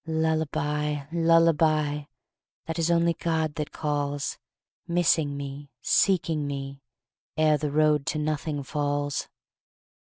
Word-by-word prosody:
Lullabye 150 -2 -1
lullabye 160 -3 +3 0.6
That 165 +1 -4
is 165 0 +1
only 170 0 +3
God 160 -2 -1
that 150 -1 -4
calls, 145 -2 -2 0.5
Missing 160 -4 +2
me, 140 0 -7
seeking 165 -6 +2
me, 140 -1 -5 0.6
Ere 155 -1 +3
the 150 0 -1
road 150 -1 +2
to - - -1
nothing 150 -1 -2
falls! 145 0 -2
150 Hz, 110 wpm, -26 LUFS, 145-160 Hz, 0.6 s, lullabye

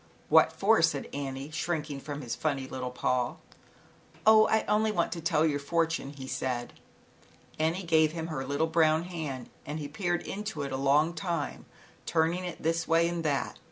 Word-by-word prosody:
"What - - +6
for," - - +3
said - - +1
Annie, 135 +1 -4
shrink 155 -1 -2
ing 140 - -5
from 145 +1 -6
his 120 - -3
funny 140 -4 -1
little 130 -1 -4
paw. 125 0 0 0.9
"Oh, 215 0 +7
I 220 - +2
only 215 +1 +2
want 170 -5 0
to 170 - -4
tell 160 -1 +2
your 145 -2 +1
fortune," 165 -1 -1 0.2
said 125 -1 -3
he. 155 - -12
Annie 170 +4 0
gave 160 -2 +4
him 165 -1 -4
her 155 -5 -3
little 140 +3 0
brown 160 0 +3
hand, 155 -8 -5
and 150 +2 -5
he 150 -2 -4
peered 175 -2 -2
into 205 -7 -4
it 140 - -4
a - - -1
long 145 +5 +3
time 170 -5 -3 0.4
turn 165 0 +2
ing 180 +1 -4
it 175 - -7
this 165 +1 0
way 165 +1 +4
and 170 -1 -3
that. 140 -3 -1
160 Hz, 190 wpm, -29 LUFS, 140-170 Hz, 0.9 s, Oh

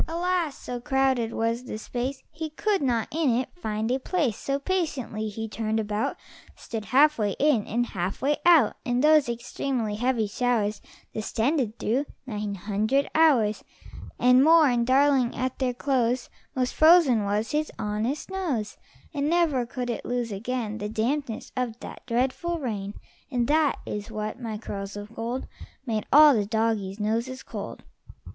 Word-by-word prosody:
Alas! 340 -2 -1
So 245 -1 -6
crowded 260 -2 +1
was 230 +2 -1
the 215 - -5
space 250 +4 -4
He 320 0 -5
could 400 +6 0
not 240 -5 +1
in 315 -2 +1
it 255 +2 -1
find 220 -7 -2
a 260 - +1
place; 280 - 0
So, 275 +4 -2
patiently, 280 - -2
he 225 +2 -5
turned 220 +1 -2
about, 210 0 -2 0.4
Stood 220 -3 -6
half 280 +5 +4
way 205 -2 0
in, 285 -8 +2
and 240 +2 0
half 185 -3 -3
way 290 +2 +1
out, 330 -10 +5
And 245 +1 0
those 305 -4 +5
extremely 235 -1 -2
heavy 245 -1 +1
showers 210 -1 0 0.3
Descended 230 +2 -1
through 265 +6 0 0.2
nine 210 -4 -4
hundred 215 +8 0
hours 250 -10 +3 0.5
And 250 +1 +5
more; 320 0 +7
and, 240 -1 +1
darling, 265 -2 +3
at 255 +1 -3
their 255 -2 0
close 250 -2 0 0.2
Most 255 -1 0
frozen 310 -9 +6
was 205 +2 -1
his 305 0 -1
honest 225 - -2
nose; 290 - -2 0.4
And 290 0 0
never 315 -8 +2
could 250 -1 -3
it 235 - -5
lose 245 -2 -2
again 220 +1 -3
The 210 - -3
dampness 230 +2 -2
of 245 -3 -2
that - - -9
dreadful 260 +8 0
rain. 210 -8 -4 0.3
And 245 -4 0
that 305 -1 +3
is 210 +1 -5
what, 215 +2 -5
my 225 -3 -4
curls 200 -2 -6
of 205 +2 -8
gold, 235 +3 -3 0.4
Made 220 -4 -2
all 300 +1 +9
the 210 -4 0
doggies' 215 -3 -1
noses 230 +5 -2
cold. - - -7
245 Hz, 160 wpm, -26 LUFS, 220-280 Hz, 0.5 s, all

